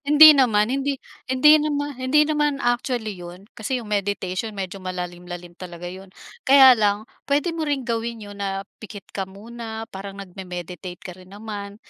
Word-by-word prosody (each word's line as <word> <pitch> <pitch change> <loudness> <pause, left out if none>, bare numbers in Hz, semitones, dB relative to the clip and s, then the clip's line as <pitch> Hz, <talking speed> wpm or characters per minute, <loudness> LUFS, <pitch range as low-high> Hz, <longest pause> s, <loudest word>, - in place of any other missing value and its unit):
hindi 300 +1 +9
naman 235 -5 +3
hindi 275 0 -1 0.3
hindi 300 +4 +6
naman 290 -1 -1
hindi 295 +4 +4
naman 295 -1 +1
actually 240 -3 -1
yun. 175 +2 -10
Kasi 240 +4 -3
yung 215 -4 -6
meditation 200 +1 -2
medyo 195 0 -5
malalim-lalim 175 -1 -6
talaga 175 -1 -8
yun. 185 +2 -8 0.4
Kaya 265 -1 +9
lang 210 -2 +1 0.2
puwede 290 +4 +1
mo 320 -2 -3
ring 280 -3 -1
gawin 235 0 -2
yun 205 -2 -10
na 195 0 -2 0.2
pikit 205 -3 -9
ka 190 -1 -4
muna 225 +2 -8
parang 195 0 -7
nagme-meditate 180 -2 -7
ka 185 - -6
rin 185 +1 -16
naman, 205 -1 -7
210 Hz, 160 wpm, -23 LUFS, 190-260 Hz, 0.4 s, hindi